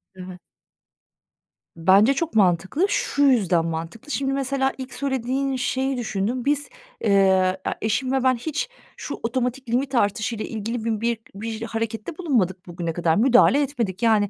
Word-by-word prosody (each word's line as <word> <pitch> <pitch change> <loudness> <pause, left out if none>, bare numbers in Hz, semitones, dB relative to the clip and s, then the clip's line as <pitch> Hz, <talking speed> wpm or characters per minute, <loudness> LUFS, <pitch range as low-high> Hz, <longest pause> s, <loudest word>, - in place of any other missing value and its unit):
Evet. 185 -1 -9 1.4
Bence 195 +9 +5
çok 320 +1 -3
mantıklı. 190 - +3
Şu 285 -7 0
yüzden 195 -11 +3
mantıklı. 165 - -5
Şimdi 270 -1 -1
mesela 270 0 0
ilk 260 -1 -7
söylediğin 265 0 -1
şeyi 265 +1 -1
düşündüm. 235 +1 -2
Biz, 290 0 0 0.3
eee, 190 -2 +3
e - - +2
eşim 255 +4 0
ve 265 -1 +1
ben 260 -1 +4
hiç 310 - -3 0.3
şu - - -6
otomatik 250 +1 -2
limit 260 +3 0
artışıyla 215 0 0
ilgili 225 +1 -4
bi 220 -2 -1
bir 235 -1 0 0.2
bir 220 +2 -5
harekette 225 +5 -4
bulunmadık 220 - 0
bugüne 170 -1 -4
kadar, 165 -1 +1
müdahale 250 +5 +5
etmedik. 235 -10 -2
Yani, 215 -3 +3
230 Hz, 145 wpm, -23 LUFS, 195-270 Hz, 1.4 s, Bence